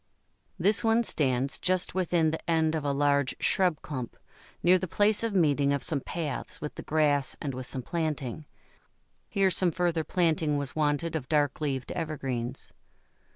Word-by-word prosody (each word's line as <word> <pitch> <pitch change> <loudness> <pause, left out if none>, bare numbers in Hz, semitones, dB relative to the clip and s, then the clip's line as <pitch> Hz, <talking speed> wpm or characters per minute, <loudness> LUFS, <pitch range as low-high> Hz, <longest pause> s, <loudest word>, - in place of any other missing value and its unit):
This 200 +6 +2
one 225 +1 +3
stands 135 - +1
just 185 -1 0
within 175 -3 +1
the 160 - -6
end 160 -1 +2
of 155 -2 -2
a 145 - 0
large 140 -1 +1
shrub 180 -6 +1
clump, 130 -5 -6 0.5
near 185 +1 +5
the 185 - -3
place 205 +4 +3
of 225 -3 -2
meeting 145 -5 +3
of 140 - -2
some 145 -4 0
paths 160 -1 -4
with 150 - -5
the - - -7
grass 145 -3 +1
and 140 -3 -4
with 130 0 -6
some 130 - -3
planting; 150 -3 -3 0.8
here 195 -2 +2
some 185 0 +2
further 170 -1 0
planting 160 -3 +1
was 140 -2 -3
wanted 155 +2 0
of 130 -5 -4
dark 145 -2 +1
leaved 135 -3 -2
evergreens. 135 -6 -4
155 Hz, 165 wpm, -28 LUFS, 140-175 Hz, 0.8 s, near